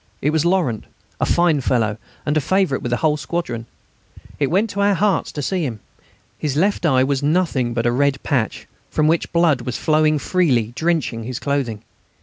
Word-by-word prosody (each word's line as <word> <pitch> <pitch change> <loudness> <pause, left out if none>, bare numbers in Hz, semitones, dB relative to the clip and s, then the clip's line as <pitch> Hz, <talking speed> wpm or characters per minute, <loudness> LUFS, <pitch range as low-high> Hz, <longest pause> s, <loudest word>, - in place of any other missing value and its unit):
It 150 - +1
was 160 -1 +1
Laurent, 170 - +1 0.3
a - - +1
fine 170 -4 +3
fellow, 110 -4 0 0.3
and 145 - 0
a 155 - +3
favourite 185 -3 +1
with 120 - -3
the 120 - +1
whole 150 0 +1
squadron. 135 -8 -4 0.7
It 140 -2 +1
went 200 +5 +1
to 200 - -5
our 200 0 +3
hearts 200 +1 +1
to 145 - -4
see 185 +3 -1
him. 120 -7 -4 0.6
His 145 -3 -2
left 190 0 +2
eye 130 -3 +4
was 135 0 0
nothing 145 -6 +1
but 115 -1 0
a 120 - +3
red 140 +2 +2
patch, 125 -7 -1 0.2
from 155 - +1
which 165 +1 +1
blood 165 -6 +3
was 125 +1 -4
flowing 155 0 +2
freely, 135 - +1
drenching 160 -9 -1
his 125 0 -4
clothing. 130 -7 -2
145 Hz, 190 wpm, -20 LUFS, 125-170 Hz, 0.7 s, eye